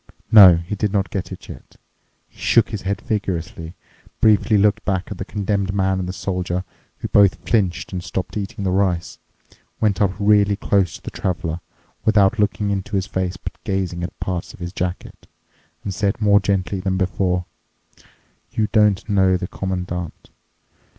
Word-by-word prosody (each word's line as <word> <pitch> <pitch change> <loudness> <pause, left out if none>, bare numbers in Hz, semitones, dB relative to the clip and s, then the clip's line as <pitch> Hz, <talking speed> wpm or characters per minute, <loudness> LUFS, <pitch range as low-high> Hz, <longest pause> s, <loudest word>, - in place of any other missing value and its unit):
No, 95 -6 +10
he 85 +4 -5
did 105 0 -1
not 100 -2 -1
yet 95 - -2
get - - -15 0.2
it. - - -13 0.5
He - - -24
shook 115 - +3
his 105 -2 -4
head 100 0 -2
vigorously, 90 -5 -3 0.4
briefly 110 0 +4
looked 100 0 +2
back 95 0 -2
at 100 - -6
the 95 - -3
Condemned 100 -2 -1
Man 95 -1 +1
and 90 -1 -3
the - - -1
Soldier, 90 -1 -2 0.3
who - - -4
both 100 -2 +3
flinched 95 -5 0
and 90 -1 -3
stopped 90 +2 -4
eating 100 -1 -4
the 95 - 0
rice, 90 -3 0 0.6
went 105 -2 +1
up 100 - +4
really 105 -1 +4
close 95 -3 +1
up - - -25
to - - -6
the - - -23
Traveler, 85 -3 -2 0.4
without 110 0 +3
looking 105 0 +1
into 100 +1 -3
his 95 -1 0
face, 95 -2 -2
but - - -9
gazing 95 -3 -2
at 90 - -6
parts 90 -2 -4
of - - -20
his 90 0 -6
jacket, 90 -1 -5 0.6
and 100 - -3
said 100 +2 -1
more 100 -1 +5
gently 100 -1 -1
than 95 0 -1
before: 90 -1 0 1.1
"You 110 -1 0
don't 105 -3 +3
know 95 -3 +3
the 90 0 -4
Commandant. 90 -3 -5
95 Hz, 175 wpm, -21 LUFS, 90-100 Hz, 1.1 s, No